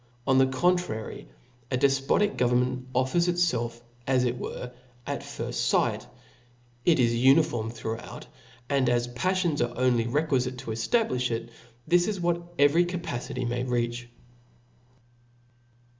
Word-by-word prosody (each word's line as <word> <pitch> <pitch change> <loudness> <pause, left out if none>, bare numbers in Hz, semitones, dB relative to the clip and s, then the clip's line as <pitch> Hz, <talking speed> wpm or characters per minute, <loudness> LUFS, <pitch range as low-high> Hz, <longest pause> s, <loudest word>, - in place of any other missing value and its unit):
On 130 -1 +4
the 130 - +5
contrary, 135 -5 -1 0.4
a 130 - 0
defpotic 135 +10 +2
government 125 +1 +1
offers 130 +8 +2
itfelf,.as 120 -6 -1
it 125 0 0
were, 125 - -6 0.3
at - - -3
firft - - -3
fight; - - +1 0.8
it 165 -1 +3
is 120 -2 +3
uniform 125 -2 +3
throughout; 115 -1 -6 0.4
and 135 -2 +2
as 120 0 +1
pafIion$ 175 +4 0
only 125 -2 +2
are - - -3
requifite 130 -2 0
to 125 -3 -6
eftabliih 125 - 0
it, 115 0 -3 0.4
this 175 0 +3
is 210 -3 -2
what 170 0 -1
every 145 +5 +5
capacity 130 -8 -4
may 120 +1 -1
reach. 120 -1 -2
130 Hz, 125 wpm, -27 LUFS, 120-165 Hz, 0.8 s, the